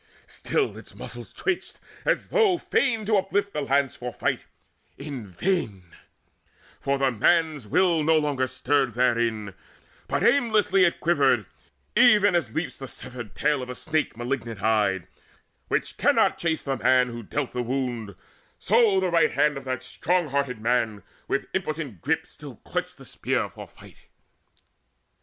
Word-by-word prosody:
Still 415 Hz, -, -2 dB
its -, -, -14 dB
muscles -, -, -8 dB
twitched, 360 Hz, -1 st, -3 dB, 0.3 s
as -, -, 0 dB
though 425 Hz, -7 st, +3 dB
Fain 230 Hz, -9 st, 0 dB
to 215 Hz, 0 st, +3 dB
uplift 200 Hz, +1 st, 0 dB
the 150 Hz, -, -1 dB
lance 140 Hz, -1 st, +1 dB
for 125 Hz, 0 st, -5 dB
fight -, -, -2 dB, 0.5 s
in 140 Hz, -6 st, -7 dB
vain; 100 Hz, -, -2 dB, 1.0 s
For 140 Hz, 0 st, 0 dB
the 135 Hz, -1 st, +2 dB
man's 155 Hz, +1 st, +2 dB
will 170 Hz, -, +3 dB
no 160 Hz, +1 st, +4 dB
longer 145 Hz, -4 st, 0 dB
stirred 130 Hz, -1 st, 0 dB
therein, 115 Hz, -4 st, +1 dB, 0.5 s
But -, -, -1 dB
aimlessly 210 Hz, -7 st, +4 dB
it 170 Hz, -, 0 dB
quivered, 140 Hz, -, +3 dB, 0.5 s
even 210 Hz, -4 st, +6 dB
as 150 Hz, -11 st, 0 dB
leaps 165 Hz, +1 st, -3 dB
The 135 Hz, -, -6 dB
severed 120 Hz, -5 st, -9 dB
tail 150 Hz, -2 st, +1 dB
of 125 Hz, -, -7 dB
a 125 Hz, -, -5 dB
snake 155 Hz, -2 st, -2 dB
malignant 120 Hz, -4 st, -4 dB
eyed, 100 Hz, -5 st, +1 dB, 0.6 s
Which -, -, -2 dB
cannot -, -, +3 dB
chase 165 Hz, -2 st, -1 dB
the 135 Hz, -1 st, -2 dB
man 125 Hz, 0 st, +3 dB
who 120 Hz, 0 st, -6 dB
dealt 135 Hz, +5 st, -3 dB
the 125 Hz, -, -2 dB
wound; 120 Hz, -5 st, -3 dB, 0.4 s
So 215 Hz, -2 st, +3 dB
the 185 Hz, -2 st, 0 dB
right 170 Hz, -1 st, +3 dB
hand 150 Hz, 0 st, +2 dB
of 135 Hz, -1 st, -7 dB
that 130 Hz, -1 st, -3 dB
strong 175 Hz, +4 st, 0 dB
hearted 135 Hz, -4 st, -1 dB
man 110 Hz, -3 st, 0 dB, 0.2 s
With 140 Hz, -, -1 dB
impotent 155 Hz, -, -3 dB
grip -, -, 0 dB
still -, -, -11 dB
clutched -, -, -4 dB
the -, -, -13 dB
spear -, -, -2 dB
for -, -, -10 dB
fight. -, -, -17 dB
140 Hz, 155 wpm, -25 LUFS, 120-175 Hz, 1.0 s, even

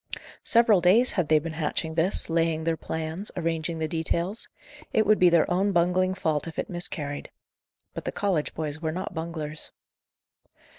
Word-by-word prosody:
Several 230 Hz, -5 st, +4 dB
days 220 Hz, +9 st, +5 dB
had 180 Hz, -6 st, 0 dB
they 155 Hz, -, +6 dB
been 160 Hz, +1 st, -3 dB
hatching 160 Hz, +1 st, -2 dB
this, 165 Hz, +4 st, +1 dB
laying 165 Hz, -1 st, +1 dB
their 165 Hz, 0 st, +1 dB
plans, 160 Hz, +5 st, -4 dB
arranging 165 Hz, -1 st, -1 dB
the 160 Hz, 0 st, -1 dB
details; 170 Hz, +5 st, -1 dB, 0.4 s
it 220 Hz, -, +3 dB
would 215 Hz, +1 st, +4 dB
be 180 Hz, -, +7 dB
their 170 Hz, -2 st, +4 dB
own 195 Hz, +3 st, +2 dB
bungling 180 Hz, +2 st, +2 dB
fault 155 Hz, -4 st, -1 dB
if 165 Hz, -, -8 dB
it -, -, -3 dB
miscarried. 150 Hz, -5 st, -4 dB, 0.6 s
But -, -, -7 dB
the -, -, -1 dB
college 185 Hz, -7 st, -1 dB
boys 155 Hz, -1 st, -4 dB
were 160 Hz, -1 st, -1 dB
not 185 Hz, +4 st, -5 dB
bunglers. 160 Hz, -2 st, -5 dB
165 Hz, 165 wpm, -26 LUFS, 160-185 Hz, 0.6 s, be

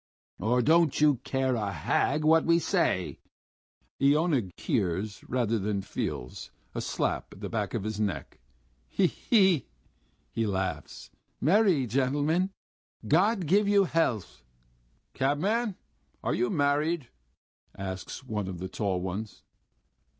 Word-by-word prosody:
Or 120 Hz, +3 st, +2 dB
don't 160 Hz, +2 st, +4 dB
you 150 Hz, -3 st, +5 dB
care 130 Hz, +1 st, -1 dB
a 105 Hz, -4 st, -1 dB
hang 140 Hz, -, 0 dB
what 160 Hz, +1 st, +5 dB
we 170 Hz, 0 st, +4 dB
say?" 170 Hz, -, 0 dB, 0.8 s
And 140 Hz, -, +4 dB
Iona 150 Hz, -, +2 dB
hears 100 Hz, +1 st, -1 dB
rather 115 Hz, -3 st, +1 dB
than 100 Hz, 0 st, -2 dB
feels 60 Hz, -8 st, -5 dB, 0.2 s
a -, -, -3 dB
slap -, -, -2 dB
on -, -, -15 dB
the -, -, -4 dB
back -, -, -2 dB
of -, -, -2 dB
his 110 Hz, 0 st, -4 dB
neck. 100 Hz, -10 st, -3 dB, 0.5 s
"He 195 Hz, -, +1 dB
he!..." 190 Hz, -, +3 dB, 0.6 s
he 115 Hz, -1 st, -1 dB
laughs. 95 Hz, -7 st, -4 dB, 0.3 s
"Merry 180 Hz, -, +3 dB
gentlemen.... 145 Hz, -, +1 dB, 0.6 s
God 190 Hz, +5 st, +3 dB
give 200 Hz, +6 st, +3 dB
you 200 Hz, -1 st, +5 dB
health!" 120 Hz, -, -1 dB, 0.7 s
"Cabman, 195 Hz, -, 0 dB, 0.5 s
are -, -, 0 dB
you 120 Hz, 0 st, +1 dB
married?" 145 Hz, 0 st, +1 dB, 0.7 s
asks 95 Hz, +6 st, -6 dB
one 105 Hz, -6 st, -3 dB
of 95 Hz, -2 st, -5 dB
the 95 Hz, +2 st, -5 dB
tall 95 Hz, -2 st, -1 dB
ones. 95 Hz, +4 st, -5 dB
130 Hz, 130 wpm, -28 LUFS, 105-165 Hz, 0.8 s, you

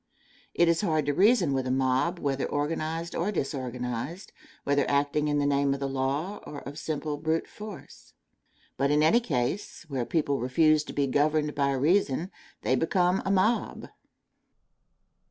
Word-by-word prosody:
It 170 Hz, -, +4 dB
is 165 Hz, -1 st, +2 dB
hard 155 Hz, -7 st, +1 dB
to 145 Hz, -, +1 dB
reason 190 Hz, -, +4 dB
with 130 Hz, -1 st, -1 dB
a -, -, -1 dB
mob 130 Hz, +6 st, +1 dB
whether 140 Hz, -4 st, -1 dB
organized 160 Hz, +3 st, -2 dB
or 185 Hz, +5 st, -1 dB
disorganized, 130 Hz, -, -4 dB, 0.3 s
whether 140 Hz, 0 st, +2 dB
acting 145 Hz, +1 st, +1 dB
in 145 Hz, 0 st, +1 dB
the 145 Hz, -, +1 dB
name 140 Hz, -1 st, +2 dB
of -, -, -7 dB
the 140 Hz, -, -2 dB
law 135 Hz, +8 st, -2 dB
or 145 Hz, -, -9 dB
of 145 Hz, +3 st, -8 dB
simple 150 Hz, -1 st, -3 dB
brute 160 Hz, +2 st, -1 dB
force. 210 Hz, -2 st, -11 dB, 0.6 s
But 140 Hz, +1 st, +1 dB
in 150 Hz, +1 st, +3 dB
any 190 Hz, +10 st, +5 dB
case, 170 Hz, -, -3 dB
where 130 Hz, -4 st, -2 dB
people 145 Hz, -4 st, 0 dB
refuse 155 Hz, +5 st, +3 dB
to -, -, -8 dB
be 140 Hz, -, +1 dB
governed 150 Hz, +2 st, +1 dB
by 140 Hz, -1 st, +1 dB
reason, 160 Hz, +4 st, +1 dB, 0.3 s
they -, -, +1 dB
become 180 Hz, +5 st, +1 dB
a -, -, +1 dB
mob. 200 Hz, +5 st, +1 dB
150 Hz, 160 wpm, -27 LUFS, 140-170 Hz, 0.6 s, any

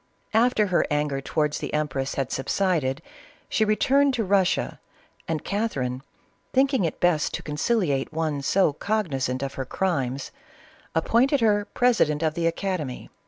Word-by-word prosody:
After 225 Hz, -1 st, +3 dB
her 180 Hz, -3 st, +2 dB
anger 150 Hz, -2 st, 0 dB
towards 150 Hz, +1 st, -1 dB
the -, -, -5 dB
empress 140 Hz, -3 st, -2 dB
had 135 Hz, -2 st, -2 dB
subsided, 155 Hz, -1 st, 0 dB, 0.4 s
she 220 Hz, -, +1 dB
returned 270 Hz, +6 st, +3 dB
to 230 Hz, -, 0 dB
Russia, 190 Hz, -2 st, +1 dB, 0.5 s
and 160 Hz, -2 st, -2 dB
Catherine, 135 Hz, -, -2 dB, 0.5 s
thinking 265 Hz, -6 st, +3 dB
it 160 Hz, -, -3 dB
best 175 Hz, -4 st, +2 dB
to -, -, -6 dB
conciliate 150 Hz, -, 0 dB
one 155 Hz, -3 st, -1 dB
so 170 Hz, +2 st, +2 dB
cognizant 140 Hz, -, -1 dB
of 135 Hz, 0 st, -4 dB
her 135 Hz, -, -4 dB
crimes, 135 Hz, -6 st, -2 dB, 0.6 s
appointed 245 Hz, -, +3 dB
her 205 Hz, -2 st, +3 dB
president 165 Hz, -12 st, +2 dB
of 155 Hz, -1 st, +1 dB
the 165 Hz, +1 st, 0 dB
academy. 165 Hz, -6 st, -3 dB
165 Hz, 140 wpm, -25 LUFS, 140-210 Hz, 0.6 s, After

